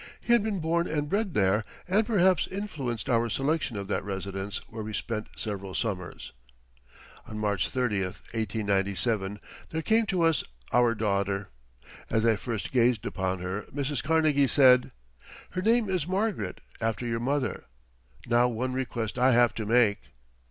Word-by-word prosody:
He 235 - +1
had 235 - +5
been 205 -2 -2
born 170 +1 +1
and 150 -1 -1
bred 200 +1 -1
there 100 +2 +3 0.2
and 200 +5 +3
perhaps 190 -4 +3
influenced 150 - -4
our 115 -2 +2
selection 145 0 -1
of 100 -1 -4
that - - -1
residence 95 0 -4
where 110 0 -7
we 110 0 -5
spent 110 -2 -3
several 100 -3 -5
summers. 95 -6 -3 1.0
On 110 - -6
March 100 -4 0
30, 110 -7 0 0.3
1897, 100 -1 -1 0.3
there 160 0 -3
came 220 +3 +3
to 185 -3 +1
us 165 -1 +3 0.3
our 120 -1 +4
daughter. 100 -2 -1 0.6
As 110 0 +1
I 115 -1 +5
first 110 0 -4
gazed 120 -4 +3
upon 95 -1 -2
her 95 +3 -4
Mrs. 140 -2 -2
Carnegie 155 -2 +3
said, 125 -2 +6 0.6
"Her 185 - -2
name 225 +2 +3
is 180 -5 -1
Margaret 200 +3 -1 0.2
after 115 +1 -1
your 115 -1 -1
mother. 130 0 -1 0.6
Now 120 +1 +4
one 125 +2 -2
request 125 -3 -3
I 130 +1 +5
have 120 0 +5
to 110 -2 -4
make." 110 -3 +4
120 Hz, 155 wpm, -28 LUFS, 105-155 Hz, 1.0 s, said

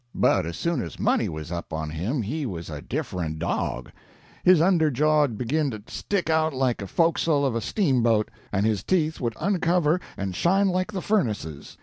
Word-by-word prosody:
But - - +2
as 85 -1 -5
soon 170 - 0
as 85 - -7
money - - +2
was 80 +1 -6
up 85 -1 -5
on 80 -1 -3
him 105 - -2
he 140 +7 -3
was 85 -5 -6
a 75 -1 -6
different 90 - -3
dog; 80 -6 -2 0.5
his 180 -2 +6
under 165 -2 +4
jaw'd 145 -3 +2
begin 145 +6 0
to 110 -4 -7
stick 195 +3 -2
out 160 -2 +2
like 130 -2 +1
the 100 - -6
fo'castle 165 - +2
of 135 - +1
a 115 - -1
steamboat, 120 - +1 0.2
and 100 0 +1
his 110 -3 +1
teeth 160 -5 0
would 115 -3 -1
uncover 175 -3 +2 0.2
and 95 -2 -3
shine 195 - +3
like 185 +3 -1
the 190 -3 -4
furnaces. 105 - -2
130 Hz, 190 wpm, -25 LUFS, -, 0.5 s, his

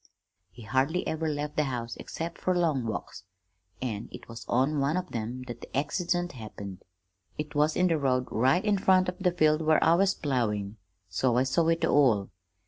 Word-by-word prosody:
"He 120 - -13
hardly 135 - 0
ever 160 0 -1
left 150 0 -3
the 150 - +3
house 120 -3 -4
except 165 +1 -6
fer 185 - +1
long 150 -9 +1
walks, 110 - -5 0.6
and 110 -3 -4
it - - -10
was 115 0 -10
on 135 +5 +2
one 140 +5 +1
of 185 0 -4
them 120 +3 -4
that 120 -2 -8
the - - -6
accident 175 +4 0
happened. 100 -6 -8 0.6
It 150 -1 -5
was 150 +1 +2
in 180 - +3
the 165 -3 +2
road 130 -2 +1
right 135 - +2
in 205 -2 +2
front 185 -1 +4
of 180 - -7
the 180 -2 +2
field 155 -2 +3
where 155 0 +3
I 165 - +5
was 190 +2 +3
ploughing, 110 -7 -1 0.3
so 115 +7 +1
I 125 - +4
saw 160 +5 +1
it 165 0 +2
all. 115 -9 +3
145 Hz, 195 wpm, -28 LUFS, 120-165 Hz, 0.6 s, I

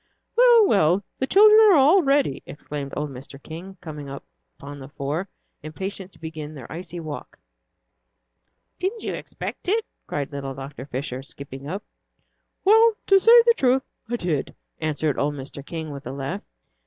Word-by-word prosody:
"Well, 475 -2 +7
well, 190 - +3 0.2
the 265 - 0
children 425 +5 +7
are 385 - +7
all 305 +7 +6
ready," 275 - +2
exclaimed 145 -1 -6
old 150 0 -2
Mr. 135 +1 -10
King, 175 +6 -9
coming 150 -3 -7
upon 140 +1 -11
the 135 - -9
four, 145 +7 -3 0.3
impatient 190 +5 -6
to - - -20
begin 155 -1 -7
their 130 -5 -9
icy 175 +2 -6
walk. 155 -3 -7 1.4
"Didn't 400 +5 -2
you - - -2
expect - - -6
it?" 440 +2 +1 0.2
cried 145 0 -3
little 135 -1 -5
Dr. 135 0 -8
Fisher, 130 -1 -4
skipping 140 0 -9
up. 195 +5 -4 0.8
"Well, 445 +3 +6
to 390 -1 +6
say 465 +4 +8
the 470 - +6
truth, 260 0 +2 0.3
I 240 - 0
did," 170 - -2 0.2
answered 155 -2 -1
old 145 +1 0
Mr. 135 0 -8
King, 160 0 -6
with 140 0 -8
a - - -4
laugh. 135 0 -4
155 Hz, 160 wpm, -24 LUFS, -, 1.4 s, say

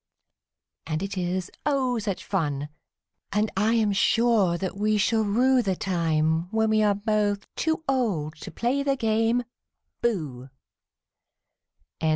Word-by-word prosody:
And 155 +2 -2
it 200 +1 -4
is, 180 0 -2
oh, 260 -5 +1
such 200 -3 -4
fun 150 -6 -1 0.6
I 210 +2 +2 0.3
am 215 -3 +2
sure 205 -3 +3
that 190 +1 -4
we 210 +1 +1
shall 220 +2 +2
rue 250 +5 +3
The 195 -5 -1
time 165 -2 0
when 220 +1 +1
we 215 0 +3
are 205 -1 +3
both 205 -1 0
too 320 0 -1
old 200 - 0
to - - -8
play 250 +4 -1
the 275 -1 +1
game 225 0 +1 0.6
"Booh!" 150 - -2
210 Hz, 130 wpm, -26 LUFS, 180-230 Hz, 0.6 s, sure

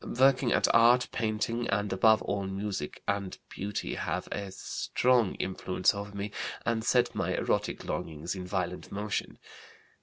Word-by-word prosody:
Working 130 -2 +5
at - - +4
art, 120 +2 +6
painting, 115 +2 -1
and 105 -1 0
above 110 +3 +5
all 100 -1 -2
music 95 -5 -4
and 100 -2 -1
beauty 100 +1 -4
have - - -2
a 100 -1 -4
strong 120 +3 +1
influence 95 0 0
over 100 0 -5
me 100 +1 -3 0.3
and 115 -1 0
set 125 +1 +3
my - - -1
erotic - - -1
longings 80 +1 -3
in 90 -2 -6
violent 90 -1 -3
motion. 105 +1 -3
105 Hz, 145 wpm, -30 LUFS, 95-115 Hz, 0.3 s, art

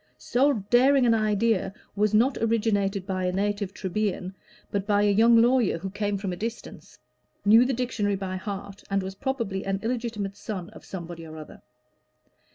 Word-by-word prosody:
So 275 +4 +2 0.2
daring 260 +2 +5
an 230 - +4
idea 215 -2 +1 0.2
was 210 0 +2
not 240 +5 +3
originated 205 -4 0
by 185 -1 -2
a 180 - +1
native 205 +1 -1
Trebian, 190 -1 -2 0.4
but 200 0 -2
by 205 -1 +3
a 205 - +4
young 230 +3 +6
lawyer 240 -5 +3
who 190 +3 -6
came 205 0 -1
from 195 -2 -3
a - - -3
distance, 225 +5 -7 0.5
knew 225 +4 +7
the 265 - 0
dictionary 225 -5 -1
by 190 -1 -4
heart, 200 0 -7
and 195 -1 0
was 190 0 -5
probably 230 -5 -3
an 195 0 -1
illegitimate 225 -4 -3
son 185 -5 -6
of - - -14
somebody 170 -2 -7
or 160 -1 -10
other. 155 - -11
205 Hz, 170 wpm, -26 LUFS, 195-230 Hz, 0.5 s, knew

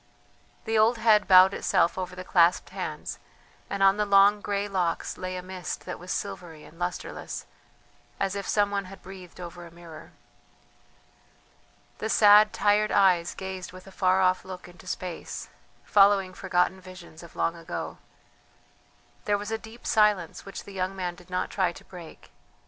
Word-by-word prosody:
The 220 0 +1
old 230 +2 +4
head 220 -2 +4
bowed 185 0 +7
itself 170 - +1
over 185 -1 -5
the 185 - -7
clasped 175 -1 +3
hands, - - -5 0.5
and 200 0 -1
on 195 +1 +5
the 210 - +1
long 200 +1 +5
grey 200 0 -2
locks 180 -4 -2
lay 185 0 -5
a 180 - -6
mist 185 -1 -6
that - - -6
was 180 +1 -8
silvery 165 -4 -5
and 165 - -16
lustreless, 180 0 -5 0.7
as 195 -1 0
if 200 0 -5
some 205 -1 +2
one 200 -1 -2
had 195 +1 -12
breathed 185 -2 -12
over 175 0 -8
a 170 - -11
mirror. 165 -2 -13 1.9
The 220 - -3
sad, 210 -1 +6
tired 210 +1 +2
eyes 180 -4 +3
gazed 190 -1 -7
with 185 0 -12
a 195 - -13
far 185 0 +2
off 185 0 +2
look 185 -1 -9
into 180 +1 -16
space, 180 -1 -6 0.4
following 195 -2 +4
forgotten 185 0 0
visions 185 -3 -12
of 170 - -14
long 165 - 0
ago. 165 -1 -6 1.3
There 205 0 +2
was 205 +2 -6
a 225 - 0
deep 220 +2 -14
silence 210 -6 +2
which 195 - -7
the 200 - -12
young 190 0 -2
man 180 -2 -3
did 175 +1 -18
not 180 0 -2
try 185 -3 +1
to - - -14
break. 175 -3 -13
185 Hz, 170 wpm, -27 LUFS, 180-200 Hz, 1.9 s, bowed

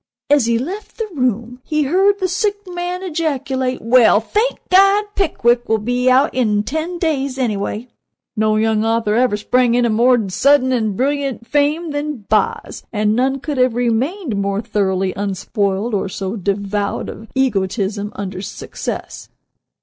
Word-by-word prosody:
As 285 -5 +4
he 235 0 +2
left 365 - -6
the 450 - -3
room 245 -3 -1
he 305 -1 0
heard 385 +8 +3
the 375 - +1
sick 385 +3 0
man 355 0 -4
ejaculate: 280 -7 -2
"Well 230 -2 +5
thank 430 - -1
God, 395 +2 +5
Pickwick 240 - +1
will 220 - +3
be 245 +4 0
out 265 +4 +4
in 210 -5 +1
ten 315 +9 -3
days, 280 -6 -1
anyway!" 220 -1 -2 0.5
No 215 -1 +2
young 220 0 +1
author 225 -1 +1
ever 235 -2 +2
sprang 245 +2 +2
into 240 -2 +2
more 235 -1 +3
sudden 260 +6 +3
and 220 -5 0
brilliant 275 -2 -1
fame 295 +5 0
than 290 -6 -4
"Boz," 210 -2 0
and 210 -1 +1
none 265 +3 +1
could 295 -4 -3
have 255 -2 +3
remained 245 - -1
more 200 0 -1
thoroughly 190 -3 -1
unspoiled, 200 +2 -2
or 195 -1 -1
so 190 +2 -4
devoid 200 0 -2
of 220 - -9
egotism 205 -4 -1
under 190 -2 -5
success. 190 - -6
245 Hz, 150 wpm, -18 LUFS, 210-290 Hz, 0.5 s, Well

